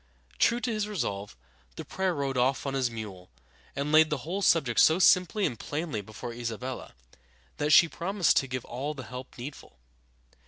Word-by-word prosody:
True 235 +1 +3
to 240 -2 -1
his 215 -1 -1
resolve, 100 - -4 0.4
the - - -7
prior 190 -2 -1
rode 140 -2 -2
off 130 +3 +1
on 135 - -2
his 130 -2 +1
mule, 100 -6 -8 0.5
and 140 +2 -2
laid 155 0 +6
the 150 -4 -3
whole 185 +5 -3
subject 145 - +3
so 160 - +6
simply 185 +2 +4
and 115 - -3
plainly 150 -7 -3
before 110 +3 -8
Isabella 120 - -6 0.6
that 150 - 0
she 165 +2 +7
promised 180 +2 +1
to 135 - +2
give 125 -1 -4
all 140 +5 -4
the 130 - -7
help 125 +1 -9
needful. 125 - -9
135 Hz, 180 wpm, -28 LUFS, 120-170 Hz, 0.6 s, she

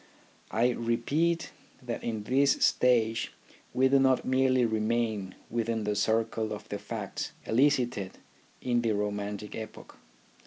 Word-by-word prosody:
I 120 +3 +2
repeat 140 +9 0 0.3
that 120 -2 -5
in 110 -3 -3
this 135 +5 +3
stage 115 -3 +2 0.4
we 130 +1 +3
do 135 +1 +4
not 130 -1 +3
merely 130 -1 +3
remain 110 -3 -1
within 115 -1 -1
the 105 0 -1
circle 110 +1 0
of 105 - -8
the 100 - -4
facts - - -5
elicited 125 -6 +1 0.5
in 120 -1 +2
the 115 -2 +1
romantic 105 0 -3
epoch. 110 -1 -9
115 Hz, 125 wpm, -29 LUFS, 110-130 Hz, 0.5 s, do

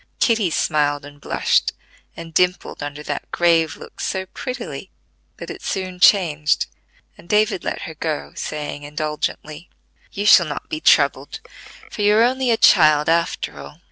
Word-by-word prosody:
Kitty 225 -6 +2
smiled 145 -2 0
and 145 0 -14
blushed, - - +1 0.4
and 165 -1 -9
dimpled 180 +1 0
under 145 +1 -6
that 145 -1 -5
grave 165 -2 +2
look - - -14
so 190 -1 -2
prettily 215 - -7 0.5
that - - -8
it - - -9
soon 185 -1 -4
changed, 160 -6 +3 0.5
and 170 - -17
David 210 -3 +1
let - - -4
her 165 - -7
go, 155 -1 -4
saying 150 -1 -5
indulgently: 150 +2 -5 0.4
"You 205 - -4
shall 185 -5 +7
not 145 - -6
be 155 - -3
troubled, 140 -2 +2 0.5
for - - -6
you 205 +1 +4
are 225 - +5
only 255 +1 +1
a 230 - +3
child 155 -7 +5
after 165 - -1
all. 70 0 -11
160 Hz, 155 wpm, -20 LUFS, 150-190 Hz, 0.5 s, shall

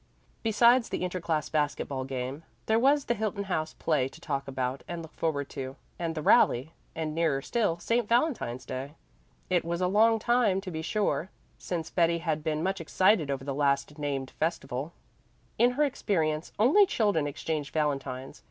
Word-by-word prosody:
Besides 235 +2 +4
the - - -2
inter 180 0 -2
class 160 -3 -1
basket 150 -2 -1
ball 130 -2 -3
game, 130 +2 -4 0.2
there 220 +1 +3
was 280 +3 +3
the 235 - +1
Hilton 215 -2 -2
House 160 -5 -2
play 150 -6 +1
to 135 - -13
talk 140 -4 -3
about 130 0 -2
and 170 -1 -5
look 160 - -12
forward 145 -4 -1
to, 130 0 -6 0.2
and 165 -2 -2
the 155 - -3
rally; 135 +4 +4 0.2
and, 160 -1 -3
nearer 160 -4 +1
still, 205 -6 0
St. 230 +5 0
Valentine's 235 - +1
day. 135 +4 -6 0.6
It 175 -2 +3
was 170 +1 -2
a 185 - +1
long 220 +4 +4
time, 225 -4 +2
to 190 -2 -6
be 160 -1 -4
sure, 195 0 0 0.3
since 165 -3 -4
Betty 170 -1 +3
had 160 -3 -2
been 155 0 -1
much 190 0 -1
excited 175 -1 +3
over 135 -1 -2
the 140 0 -3
last 140 +1 0
named 140 -3 -2
festival; 145 -3 -2 0.7
in 245 +2 +5
her 295 +4 +2
experience 165 - 0
only 310 - +5
children 205 - +1
exchanged 150 0 -3
valentines. 135 -4 -2
160 Hz, 180 wpm, -29 LUFS, 140-205 Hz, 0.7 s, in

